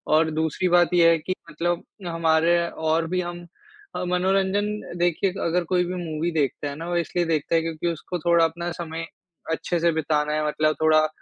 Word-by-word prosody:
और 160 0 +3
दूसरी 160 +3 0
बात 175 0 +4
ये 170 -1 +6
है 165 - +3
कि 185 +4 -3 0.2
मतलब 170 +3 -1 0.2
हमारे 165 0 +3
और 160 +1 0
भी 185 0 0
हम 175 0 -6 0.5
अ, - - -2
मनोरंजन 190 +3 +1 0.3
देखिए 175 +2 +1
अगर 175 +1 +1
कोई 180 - +4
भी 180 +1 -4
मूवी 160 +1 -2
देखता 145 -2 -1
है 140 - -6
ना 165 +3 -7
वो 175 - -1
इसलिए 175 +1 0
देखता 165 0 0
है 165 - +4
क्योंकि 165 +1 -3
उसको 170 +2 -3
थोड़ा 170 +1 +3
अपना 170 +2 -3
समय 165 -1 -5 0.5
अच्छे 170 +1 -1
से 170 0 +3
बिताना 150 -1 0
है, 155 0 0
मतलब 155 +1 +1
थोड़ा 155 0 +5
165 Hz, 195 wpm, -24 LUFS, 160-175 Hz, 0.5 s, ये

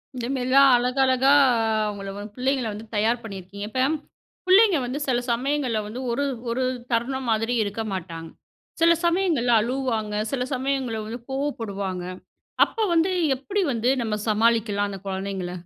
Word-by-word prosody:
இந்த 245 -2 -4
மாரிலாம் 270 +1 +5
அழகழகா 260 +2 +3 0.2
அ - - +2 0.3
அவங்கள 200 -1 -5
வந்து 205 0 -8
பிள்ளைங்கள 260 -1 0
வந்து 215 +2 -8
தயார் 225 +3 +1
பண்ணியிருக்கீங்க. 200 -1 -7
இப்ப 260 +4 +1 0.6
புள்ளைங்க 390 -1 +6
வந்து 260 +4 -3
சில 245 -2 +2
சமயங்கள்ல 255 -2 0
வந்து 235 +4 -6
ஒரு 285 +4 0 0.2
ஒரு 255 +3 -1 0.3
தருணம் 255 +3 -1
மாதிரி 225 +2 0
இருக்க 205 +2 -4
மாட்டாங்க. 165 -3 -6 0.5
சில 335 0 +6
சமயங்கள்ல 340 -9 +2
அழுவுவாங்க, 235 -3 -2 0.2
சில 255 -2 -1
சமயங்கள்ல 260 -4 -1
வந்து 230 +3 -6
கோவப்படுவாங்க. 200 -10 -3 0.6
அப்ப 445 -2 -2
வந்து 335 +3 +3 0.3
எப்படி 395 +10 -2
வந்து 235 +2 +1
நம்ம 220 -2 -1
சமாளிக்கலாம் 215 -2 +2
அந்த 195 - -6
குழந்தைங்கள? 190 -2 -4
240 Hz, 140 wpm, -24 LUFS, 210-270 Hz, 0.6 s, புள்ளைங்க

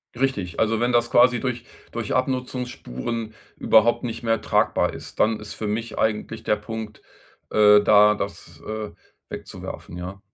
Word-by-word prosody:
Richtig, 120 -9 -1
also 110 0 +2
wenn 120 +2 +1
das 120 0 +2
quasi 120 0 +5
durch 120 -2 -3 0.3
durch 115 -3 -3
Abnutzungsspuren 125 - -3 0.2
überhaupt 115 +3 +4
nicht 115 -1 -5
mehr 115 -1 +1
tragbar - - +1
ist, - - -10
dann 110 0 +2
ist 105 0 -8
für 110 - -5
mich 110 +2 -3
eigentlich 110 0 -1
der - - +2
Punkt, 105 0 -7 0.5
äh, 105 -1 +6
da 105 0 +6
das, 100 -4 -7
äh, 110 0 -5 0.4
wegzuwerfen, 85 - -8
ja. 90 +2 -7
110 Hz, 150 wpm, -23 LUFS, 105-120 Hz, 0.5 s, äh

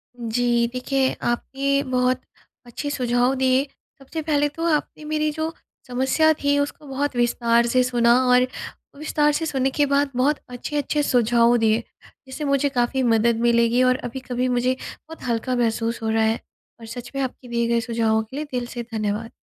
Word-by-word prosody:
जी 235 0 +1
देखिए, 260 +1 0
आपके 275 +3 0
बहुत 255 0 +1 0.4
अच्छे 245 +5 -5
सुझाव 245 -2 +1
दिए 260 0 +2 0.4
सबसे 295 +4 -6
पहले 295 -2 +1
तो 330 +3 -5
आपने 300 - -5
मेरी 305 0 0
जो 315 +2 -3 0.3
समस्या 265 +6 +2
थी 285 0 +3
उसको 285 +1 -3
बहुत 275 0 -2
विस्तार 235 -1 +2
से 255 +1 +3
सुना 240 -1 +3 0.2
और 250 0 +5 0.5
विस्तार 295 0 +1
से 325 +2 -1
सुनने 270 -3 0
के 290 +2 +1
बाद 280 0 +1
बहुत 280 +4 +2
अच्छे-अच्छे 295 +4 -2
सुझाव 240 -2 +3
दिए। 225 0 +2 0.4
जिससे 265 +4 -6
मुझे 280 0 +2
काफ़ी 260 0 0
मदद 230 -1 +2
मिलेगी 235 +1 +3
और 255 0 +4
अभी-कभी 250 0 -3
मुझे 250 +1 +1
बहुत 325 +1 -11
हल्का 240 +2 -1
महसूस 230 -1 -1
हो 220 - 0
रहा 220 0 +2
है 220 +1 +1 0.4
और 230 - -10
सच 240 +1 -8
में 275 - -1
आपके 255 0 -6
दिए 235 -1 0
गए 235 0 +2
सुझावों 225 -2 0
के 225 +5 -12
लिए 305 - -3
दिल 245 -1 -1
से 240 - -3
धन्यवाद। 215 +1 -2
250 Hz, 175 wpm, -23 LUFS, 235-280 Hz, 0.5 s, और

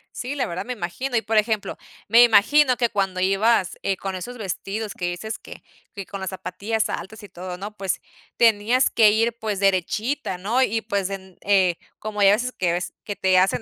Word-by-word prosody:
Sí, 260 +4 -4
la 265 - 0
verdad 175 +5 -5
me 250 - -3
imagino. 240 +6 -4
Y, 225 - +3
por 225 -1 0
ejemplo, 215 -1 0 0.3
me 235 +2 +8
imagino 250 +5 +5
que 240 -2 +1
cuando 195 -3 -1
ibas, 195 +1 +2
eh, 195 - 0
con 190 0 -5
esos 245 +7 -7
vestidos 205 +1 -4
que 175 - -4
dices 220 +5 -5
que - - -12 0.3
que 200 -2 -6
con 195 +1 -7
las 190 - -3
zapatillas 200 +4 -2
altas 190 +6 -6
y 205 - -9
todo, 180 0 -7
¿no? 205 +2 -7
Pues 195 -2 -2 0.4
tenías 230 +3 +4
que 215 -2 +5
ir, 225 +2 +2
pues, 210 -3 -3
derechita, 195 - 0
¿no? 225 +8 0
Y, 225 -3 +1
pues, 200 -2 -2
en 190 -2 -8
eh, 190 -4 +3 0.2
como 215 -1 -4
ya 195 - +7
hay 200 - +6
veces 250 +4 -1
que 175 -2 +1
ves 175 +1 -3
que 205 - -4
te 185 -1 +2
hacen 190 +4 +2
205 Hz, 210 wpm, -23 LUFS, 190-230 Hz, 0.4 s, me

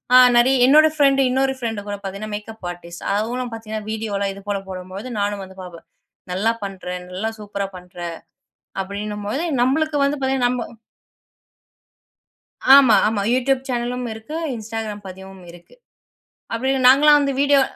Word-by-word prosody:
ஆ - - +11 0.2
நறைய 255 +3 +5
என்னோட 305 +4 +7
ப்ரண்டு 275 -2 +4
இன்னொரு 265 +1 +1
ப்ரண்டு 225 -4 -3
கூடப் 205 0 -6
பாத்தீங்கன்னா, 200 +2 -6
மேக்கப் 210 -2 -8
அர்ட்டிஸ்ட் 170 -1 -10
அவளும் 240 +4 -2
பாத்தீங்கன்னா, 220 -1 -6
வீடியோ 220 -1 -4
எல்லாம் 200 0 -1
இது 200 - -11
போலப் 195 -1 -3
போடும்பொழுது 185 +4 -7
நானும் 205 -1 -1
வந்து 190 0 -13
பாப்பேன். 175 -2 -11 0.5
நல்லா 215 +5 +1
பண்ற. 195 -1 -8 0.2
நல்லா 195 +5 -3
சூப்பரா 200 -1 -4
பண்ற 180 0 -16 0.9
அப்டின்னும்பொழுது, 210 - -4 0.2
நம்மளுக்கு 295 +4 +1
வந்து 285 +1 0
பாத்தீங்கன்னா 265 -2 +2
நம்ம 245 -2 -3 2.1
ஆமா, 265 -5 +7
ஆமா. 210 -2 -1
Youtube 260 +1 +1
சேனலும் 245 0 -2
இருக்கு. 220 +8 -7 0.2
Instagram 220 -1 -5
பதிவும் 190 0 -11
இருக்கு. 175 0 -16 0.8
அப்டி 255 +4 0 0.2
நாங்கள்லாம் 295 +3 +7
வந்து 280 -1 0
வீடியோ 285 -1 +4
220 Hz, 140 wpm, -21 LUFS, 200-260 Hz, 2.1 s, ஆ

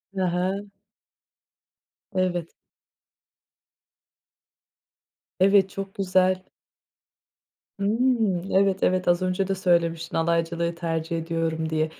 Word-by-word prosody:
Hı 190 - -1
hı. 185 +3 -1 1.5
Evet. 180 -3 -1 2.9
Evet, 195 0 +5
çok 195 0 -6
güzel. 185 -1 +2 1.4
Imm. 215 -4 +1
Evet, 195 0 +2
evet. 185 0 +1
Az 175 0 +3
önce 185 +1 0
de 195 - 0
söylemiştin 170 -3 0
alaycılığı 170 +1 0
tercih 165 -1 -2
ediyorum 165 -1 -2
diye. 155 0 0
180 Hz, 85 wpm, -25 LUFS, 165-195 Hz, 2.9 s, Evet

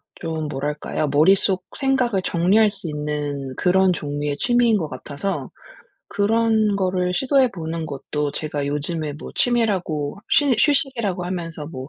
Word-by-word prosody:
좀 160 -2 -4
뭐랄까요? 150 +2 -3
머릿속 185 +5 +4
생각을 255 -7 +1
정리할 195 +6 +3
수 195 -4 -4
있는 150 -2 -3
그런 185 +3 +3
종류의 145 -2 -3
취미인 240 -2 +3
것 160 -6 -3
같아서 145 +8 -4 0.6
그런 220 0 +2
거를 185 -1 0
시도해 265 +2 +3
보는 165 -2 -4
것도 145 0 -3
제가 150 -2 -3
요즘에 150 +1 -3
뭐 150 - -9
취미라고 195 - 0
쉬 285 -4 +4
휴식이라고 255 - +1
하면서 165 -4 -5
뭐 130 -4 -8
175 Hz, 305 characters per minute, -22 LUFS, 150-210 Hz, 0.6 s, 머릿속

